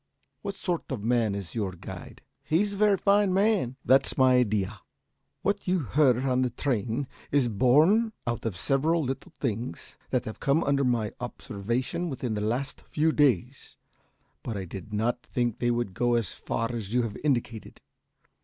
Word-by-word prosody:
What 200 Hz, -1 st, -4 dB
sort 175 Hz, -6 st, -3 dB
of 115 Hz, -6 st, -3 dB
man 115 Hz, -3 st, +2 dB
is 100 Hz, -4 st, -6 dB
your 100 Hz, -5 st, -2 dB
guide?" 90 Hz, -, -10 dB, 0.2 s
"He's 200 Hz, +6 st, +1 dB
a -, -, -5 dB
very 205 Hz, -1 st, +4 dB
fine 200 Hz, 0 st, +3 dB
man 195 Hz, -, +2 dB
" -, -, -39 dB
"That's 135 Hz, +4 st, +4 dB
my 130 Hz, -1 st, +5 dB
idea. 105 Hz, -5 st, 0 dB, 0.6 s
What 200 Hz, 0 st, -1 dB
you 185 Hz, +1 st, +3 dB
heard 130 Hz, 0 st, +3 dB
on 130 Hz, -1 st, +2 dB
the 130 Hz, -, +1 dB
train 120 Hz, +1 st, -1 dB, 0.2 s
is 140 Hz, -3 st, +3 dB
borne 150 Hz, -, +4 dB
out 120 Hz, -1 st, -2 dB
by 115 Hz, -, -1 dB
several 140 Hz, -, +1 dB
little 135 Hz, 0 st, -4 dB
things 115 Hz, -, -4 dB
that -, -, 0 dB
have 110 Hz, -, -7 dB
come 140 Hz, +4 st, +2 dB
under 140 Hz, 0 st, +2 dB
my 120 Hz, -5 st, +1 dB
observation 125 Hz, -, -3 dB
within 125 Hz, -5 st, -3 dB
the 105 Hz, -, -2 dB
last 120 Hz, +6 st, -2 dB
few 155 Hz, +1 st, +1 dB
days, 130 Hz, -, +1 dB, 0.6 s
but 115 Hz, -3 st, -4 dB
I 95 Hz, -, -4 dB
did 95 Hz, +5 st, -8 dB
not 115 Hz, +4 st, 0 dB
think 120 Hz, -3 st, -2 dB
they 120 Hz, -, +1 dB
would 120 Hz, -5 st, -1 dB
go 120 Hz, +4 st, +1 dB
as 115 Hz, -7 st, 0 dB
far 115 Hz, +1 st, -2 dB
as 110 Hz, -4 st, -5 dB
you 125 Hz, +1 st, +2 dB
have 110 Hz, -3 st, -4 dB
indicated. 120 Hz, -7 st, -1 dB
125 Hz, 175 wpm, -27 LUFS, 115-145 Hz, 0.6 s, my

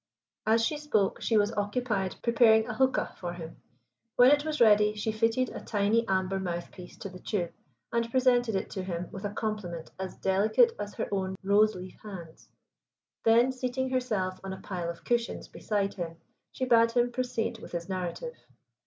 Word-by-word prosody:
As 225 Hz, +1 st, +4 dB
she 300 Hz, +3 st, -1 dB
spoke 220 Hz, -10 st, 0 dB
she 225 Hz, -, +2 dB
was 205 Hz, +2 st, +2 dB
occupied 205 Hz, -2 st, -1 dB
preparing 225 Hz, -2 st, +5 dB
a 245 Hz, -, -3 dB
huqa 260 Hz, +2 st, +1 dB
for 175 Hz, -1 st, -4 dB
him. 165 Hz, -2 st, -9 dB, 0.6 s
When 245 Hz, +2 st, +7 dB
it 290 Hz, 0 st, +4 dB
was 310 Hz, -1 st, -3 dB
ready 210 Hz, -2 st, +5 dB
she 215 Hz, +1 st, -1 dB
fitted 225 Hz, +3 st, +1 dB
a -, -, -8 dB
tiny 215 Hz, +2 st, +1 dB
amber 190 Hz, 0 st, 0 dB
mouthpiece 175 Hz, 0 st, -6 dB
to 195 Hz, -, -5 dB
the 185 Hz, 0 st, -11 dB
tube, 180 Hz, -3 st, -2 dB, 0.4 s
and 235 Hz, 0 st, +1 dB
presented 245 Hz, -3 st, +3 dB
it 190 Hz, -, -2 dB
to 190 Hz, -, -3 dB
him 180 Hz, -1 st, -4 dB
with 195 Hz, +2 st, -7 dB
a -, -, 0 dB
compliment 205 Hz, -7 st, -4 dB
as 190 Hz, -1 st, -5 dB
delicate 210 Hz, -, +3 dB
as 205 Hz, -, -5 dB
her -, -, -2 dB
own 190 Hz, -1 st, -1 dB
rose 210 Hz, +2 st, +4 dB
leaf 185 Hz, 0 st, -9 dB
hands. 175 Hz, -6 st, -10 dB, 0.8 s
Then, 235 Hz, +3 st, +5 dB
seating 260 Hz, 0 st, -2 dB
herself 215 Hz, -8 st, -1 dB
on 190 Hz, 0 st, -4 dB
a 190 Hz, -, -9 dB
pile 175 Hz, -4 st, -4 dB
of 170 Hz, -, -7 dB
cushions 240 Hz, -1 st, -1 dB
beside 200 Hz, -2 st, -2 dB
him, 165 Hz, -3 st, -5 dB, 0.3 s
she 260 Hz, -, -2 dB
bade 230 Hz, -2 st, +4 dB
him 245 Hz, 0 st, +2 dB
proceed 240 Hz, -2 st, -2 dB
with -, -, -11 dB
his 170 Hz, 0 st, -3 dB
narrative. 185 Hz, -, -4 dB
215 Hz, 180 wpm, -29 LUFS, 190-240 Hz, 0.8 s, When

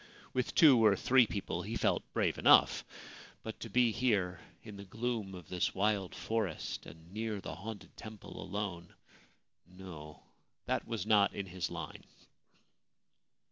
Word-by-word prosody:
With 125 Hz, -1 st, -1 dB
two 135 Hz, -8 st, +7 dB
or 105 Hz, -2 st, +6 dB
three 125 Hz, +4 st, +4 dB
people 100 Hz, -, -3 dB
he -, -, -5 dB
felt -, -, 0 dB
brave -, -, 0 dB
enough; -, -, +6 dB, 0.6 s
but 110 Hz, -, -6 dB
to 115 Hz, -, -7 dB
be 120 Hz, +2 st, +4 dB
here 105 Hz, -7 st, +1 dB, 0.2 s
in 105 Hz, -3 st, -9 dB
the 100 Hz, -, -8 dB
gloom 110 Hz, -1 st, -3 dB
of 90 Hz, -3 st, -11 dB
this 90 Hz, -1 st, -1 dB
wild 100 Hz, -1 st, 0 dB
forest 110 Hz, -8 st, -3 dB
and 80 Hz, +3 st, -14 dB
near 110 Hz, -1 st, -3 dB
the -, -, -6 dB
haunted 105 Hz, +1 st, -8 dB
temple 110 Hz, -2 st, -9 dB
alone 95 Hz, -3 st, -5 dB, 0.4 s
— -, -, -48 dB
no: 90 Hz, -5 st, -11 dB, 0.4 s
that -, -, -1 dB
was 115 Hz, -4 st, -3 dB
not 105 Hz, -2 st, +4 dB
in 100 Hz, -, -3 dB
his 90 Hz, -2 st, -4 dB
line. 80 Hz, -3 st, -7 dB
100 Hz, 150 wpm, -33 LUFS, 90-110 Hz, 0.6 s, two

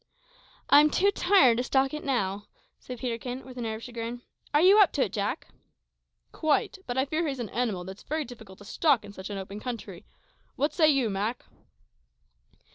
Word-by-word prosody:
"I'm 295 Hz, +1 st, +8 dB
too 395 Hz, +6 st, +2 dB
tired 355 Hz, -, +4 dB
to 245 Hz, -, 0 dB
stalk 270 Hz, +1 st, +1 dB
it 305 Hz, -, -5 dB
now," 205 Hz, -7 st, -1 dB, 0.3 s
said 250 Hz, -, -8 dB
Peterkin, 245 Hz, +1 st, -5 dB
with 260 Hz, -1 st, -11 dB
an 235 Hz, -, -3 dB
air 220 Hz, -, -3 dB
of 220 Hz, -, -10 dB
chagrin. 240 Hz, 0 st, -6 dB, 0.3 s
"Are 295 Hz, -, +4 dB
you 380 Hz, +6 st, +6 dB
up 405 Hz, -, +6 dB
to 280 Hz, -, +2 dB
it, -, -, -4 dB
Jack?" 210 Hz, +6 st, -3 dB, 0.8 s
"Quite; 315 Hz, +4 st, 0 dB
but 245 Hz, 0 st, -3 dB
I 265 Hz, -, +2 dB
fear 315 Hz, +3 st, -1 dB
he's 275 Hz, -2 st, -3 dB
an 235 Hz, -4 st, -5 dB
animal 220 Hz, -6 st, -2 dB
that's 190 Hz, +2 st, -9 dB
very 310 Hz, 0 st, -3 dB
difficult 220 Hz, -6 st, -12 dB
to 205 Hz, -, -14 dB
stalk 265 Hz, 0 st, +2 dB
in 200 Hz, -, -11 dB
such 190 Hz, 0 st, -8 dB
an 200 Hz, -, -5 dB
open 195 Hz, +2 st, -7 dB
country. 240 Hz, 0 st, -7 dB, 0.5 s
What 290 Hz, +2 st, 0 dB
say 315 Hz, -3 st, +4 dB
you, 265 Hz, -7 st, +2 dB
Mak?" 210 Hz, +5 st, -2 dB
250 Hz, 195 wpm, -27 LUFS, 220-290 Hz, 0.8 s, I'm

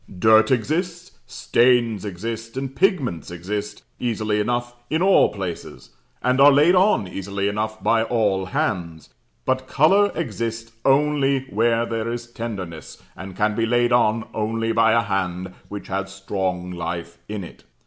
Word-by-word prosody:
Dirt 110 Hz, +3 st, +5 dB
exists, 165 Hz, -, -1 dB, 0.2 s
stains 120 Hz, -4 st, +2 dB
exist, 115 Hz, +5 st, -6 dB
and 135 Hz, 0 st, -4 dB
pigments 135 Hz, -, 0 dB
exist, 100 Hz, +4 st, -5 dB, 0.2 s
easily 110 Hz, -3 st, -1 dB
enough 120 Hz, +2 st, -1 dB, 0.2 s
in 160 Hz, -, 0 dB
all 195 Hz, 0 st, +5 dB
places; 90 Hz, -10 st, -7 dB, 0.3 s
and 130 Hz, +2 st, +2 dB
are 145 Hz, +1 st, +9 dB
laid 150 Hz, +5 st, +5 dB
on 185 Hz, -, +3 dB
easily 100 Hz, +2 st, -3 dB
enough 110 Hz, +1 st, -3 dB
by 115 Hz, -1 st, +3 dB
all 105 Hz, -5 st, 0 dB
hands; 85 Hz, -4 st, -3 dB, 0.3 s
but 130 Hz, 0 st, 0 dB
colour 195 Hz, +10 st, +4 dB
exists 115 Hz, -5 st, -4 dB
only 140 Hz, -1 st, +3 dB
where 115 Hz, +2 st, +2 dB
there 115 Hz, 0 st, -3 dB
is 120 Hz, 0 st, -5 dB
tenderness, 100 Hz, -9 st, -7 dB, 0.2 s
and 95 Hz, +1 st, -9 dB
can 105 Hz, 0 st, +1 dB
be 115 Hz, +1 st, 0 dB
laid 120 Hz, +1 st, +2 dB
on 115 Hz, -2 st, +2 dB
only 115 Hz, +1 st, -1 dB
by 115 Hz, 0 st, +4 dB
a 115 Hz, 0 st, +3 dB
hand 90 Hz, -2 st, -3 dB, 0.2 s
which 100 Hz, 0 st, -7 dB
has 100 Hz, 0 st, -3 dB
strong 95 Hz, -2 st, -3 dB
life 85 Hz, 0 st, -5 dB
in 105 Hz, -2 st, -4 dB
it. 85 Hz, -, -12 dB
110 Hz, 150 wpm, -22 LUFS, 95-125 Hz, 0.3 s, are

